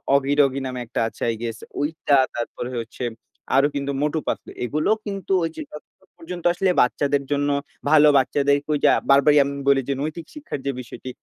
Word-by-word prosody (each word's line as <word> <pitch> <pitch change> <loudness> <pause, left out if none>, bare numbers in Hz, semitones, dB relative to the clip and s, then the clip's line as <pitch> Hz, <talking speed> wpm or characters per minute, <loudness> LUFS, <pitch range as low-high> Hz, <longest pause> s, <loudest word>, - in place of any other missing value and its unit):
'অগি 140 0 +2
doggy' 135 -1 +1
নামে 125 -1 -5
একটা 115 - -3
আছে - - -12
I - - -3
guess 115 -1 -4 0.2
ওইটা 145 -1 +1 0.2
তারপরে 120 +1 -4
হচ্ছে 115 +2 -8 0.5
আরো 140 +2 +5
কিন্তু 140 0 -2
'মটু 150 +2 0
পাতলু'। - - -3
এগুলো 155 +5 -1 0.2
কিন্তু 195 -2 -3
ওই - - -2
যে, - - -4
যতক্ষণ 150 +5 -14
পর্যন্ত 175 +1 -8
আসলে 185 +1 +1
বাচ্চাদের 140 +3 +1
জন্য 145 0 +1 0.4
ভালো 150 -1 +7
বাচ্চাদেরকে 140 +2 +1
ঐযে 145 - +4 0.2
বারবারই 140 +2 +5
আমি 140 - -3 0.2
বলি 135 -1 +4
যে, - - +2
নৈতিক 155 +2 -4
শিক্ষার 300 - -6
যে, 140 - +1
বিষয়টি 125 +1 -9
145 Hz, 180 wpm, -23 LUFS, 135-155 Hz, 0.5 s, ভালো